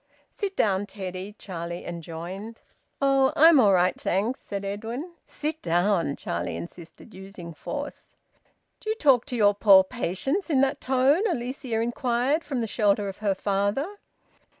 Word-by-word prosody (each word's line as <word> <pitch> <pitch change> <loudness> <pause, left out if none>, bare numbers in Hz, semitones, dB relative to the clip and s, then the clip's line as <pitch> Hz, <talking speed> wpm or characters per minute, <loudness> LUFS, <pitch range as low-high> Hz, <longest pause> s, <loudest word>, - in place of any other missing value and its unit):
"Sit 400 -2 -4
down, 200 - +1
Teddy," 190 0 -6
Charlie 170 -2 -6
enjoined. 175 +6 -7 0.4
"Oh! 270 -1 +3
I'm 320 -1 +7
all 210 -5 +6
right, 180 0 +2
thanks," 210 +8 0
said 200 0 -6
Edwin. 225 - -5 0.2
"Sit 310 +1 -4
down!" 175 -3 +1
Charlie 85 -1 -3
insisted, 165 - -10
using 190 -3 -10
force. 290 - -7 0.6
"Do 435 - -6
you 435 - +1
talk 275 - +3
to 255 - -4
your 205 -3 +4
poor 200 -2 +7
patients 250 - -2
in 275 -4 +3
that 275 +1 +1
tone?" 265 +6 +3
Alicia 250 -5 -3
inquired, 245 +5 0
from 270 -5 -3
the - - 0
shelter 205 -2 +1
of 195 - -8
her 205 -2 0
father. 205 - -1
215 Hz, 150 wpm, -26 LUFS, 190-270 Hz, 0.6 s, I'm